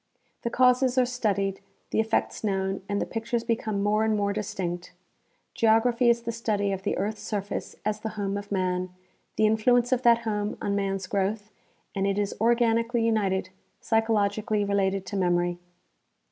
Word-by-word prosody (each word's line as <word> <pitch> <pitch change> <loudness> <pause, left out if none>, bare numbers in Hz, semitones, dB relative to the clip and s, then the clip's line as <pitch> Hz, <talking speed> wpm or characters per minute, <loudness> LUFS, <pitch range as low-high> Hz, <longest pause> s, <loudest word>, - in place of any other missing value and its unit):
The 235 - -2
causes 255 +1 +3
are 255 - +5
studied, 200 -6 -1 0.3
the - - +1
effects 220 0 0
known 195 -2 -1
and 205 0 0
the - - -1
^^ictures 230 +1 -3
be 230 -1 +2
come 210 -3 -3
more 210 +1 +2
and 220 -1 +1
more 200 0 0
distinct. 180 -4 -4 0.6
Geography 235 +2 +3
is 235 0 +2
the 230 - -2
study 210 -3 -1
of 190 -1 -3
the - - -1
earth's 210 +3 -2
surface 205 -1 -4
as 215 0 -1
the 220 - -4
home 200 -1 -1
of 205 0 -6
man, 185 -1 0 0.5
the 215 - +3
influence 235 +3 +3
of 255 -1 +2
that 235 -1 +5
home 210 -2 -2
on 200 - -1
man's 195 -1 -1
growth; 205 +3 -2 0.4
and 195 -1 0
it 195 0 0
is 205 -1 0
organically 230 0 +2
united, 195 -4 0 0.3
psychologically 215 -1 +1
related 195 -1 0
to - - -6
memory. 175 -1 +1
210 Hz, 170 wpm, -26 LUFS, 195-230 Hz, 0.6 s, are